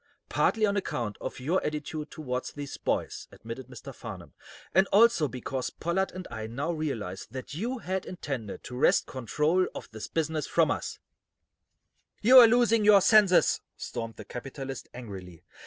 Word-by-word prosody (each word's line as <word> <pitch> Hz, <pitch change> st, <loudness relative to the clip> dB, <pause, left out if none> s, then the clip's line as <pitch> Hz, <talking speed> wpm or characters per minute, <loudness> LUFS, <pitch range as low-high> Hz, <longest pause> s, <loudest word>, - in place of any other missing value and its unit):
"Partly 220 Hz, -1 st, +2 dB
on 200 Hz, -1 st, 0 dB
account 120 Hz, -, -2 dB
of -, -, -5 dB
your 160 Hz, +9 st, 0 dB
attitude 150 Hz, 0 st, -4 dB
toward 130 Hz, -4 st, -4 dB
these 145 Hz, -1 st, -6 dB
boys," -, -, -2 dB
admitted 115 Hz, +2 st, -8 dB
Mr. 125 Hz, -3 st, -10 dB
Farnum, -, -, -9 dB, 0.4 s
"and 190 Hz, +1 st, +5 dB
also 210 Hz, -7 st, +5 dB
because 130 Hz, 0 st, -4 dB
Pollard 180 Hz, +4 st, -1 dB
and 185 Hz, 0 st, -7 dB
I 110 Hz, -1 st, -5 dB
now 140 Hz, +9 st, -2 dB
realize 125 Hz, -, -4 dB
that 130 Hz, +3 st, -7 dB
you 235 Hz, -, -2 dB
had 190 Hz, -4 st, -3 dB
intended 135 Hz, -, -5 dB
to 125 Hz, -, -8 dB
wrest 125 Hz, -, +3 dB
control 150 Hz, +8 st, 0 dB
of -, -, -8 dB
this 110 Hz, -1 st, -7 dB
business 160 Hz, -2 st, -1 dB
from -, -, +3 dB
us." -, -, -3 dB, 1.2 s
"You're 250 Hz, +1 st, +9 dB
losing 230 Hz, -2 st, +4 dB
your 205 Hz, -1 st, +8 dB
senses," 200 Hz, -2 st, +5 dB, 0.2 s
Stormed 115 Hz, -1 st, -5 dB
the -, -, -10 dB
capitalist, 135 Hz, +1 st, -7 dB
angrily. 95 Hz, -8 st, -9 dB
150 Hz, 155 wpm, -28 LUFS, 125-190 Hz, 1.2 s, You're